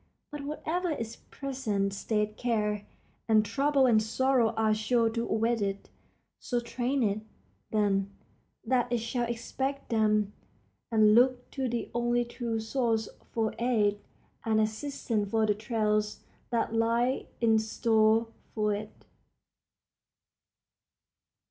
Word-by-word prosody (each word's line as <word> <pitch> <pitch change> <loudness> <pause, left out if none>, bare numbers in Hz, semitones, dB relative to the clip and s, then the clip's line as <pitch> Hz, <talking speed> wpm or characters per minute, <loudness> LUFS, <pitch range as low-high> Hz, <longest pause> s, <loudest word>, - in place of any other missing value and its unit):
But 295 -1 -6
whatever 335 +4 -2
its 230 -8 -3
present 220 -8 -3
state 210 +1 -1
care 210 -4 -1 0.4
and 215 -1 +5
trouble 275 +4 +2
and 225 -4 +5
sorrow 250 +1 +2
are 220 -1 +3
sure 225 +1 +2
to 230 +1 -2
await 225 +1 +1
it. 200 0 -3 0.5
So 245 - -1
train 245 +2 -1
it, 205 0 0 0.5
then, 200 -2 +1 0.6
that 245 0 +1
it 240 - +2
shall 235 +1 -2
expect 265 +4 -3
them 215 -2 +2 0.6
and 215 -1 +5
look 250 +2 +3
to 265 -2 -2
the 235 -1 -3
only 240 0 +1
true 235 -1 -3
source 225 -1 0 0.2
for 220 -2 0
aid 215 -4 +2 0.4
and 220 -1 +2
assistance 220 -1 -1
for 220 +1 +2
the 210 - +3
trials 210 -1 -1 0.3
that 230 -2 0
lie 230 +3 +1
in 225 -2 +4
store 220 0 +2 0.3
for 210 -1 +1
it. 210 +1 -7
225 Hz, 125 wpm, -29 LUFS, 215-245 Hz, 0.6 s, and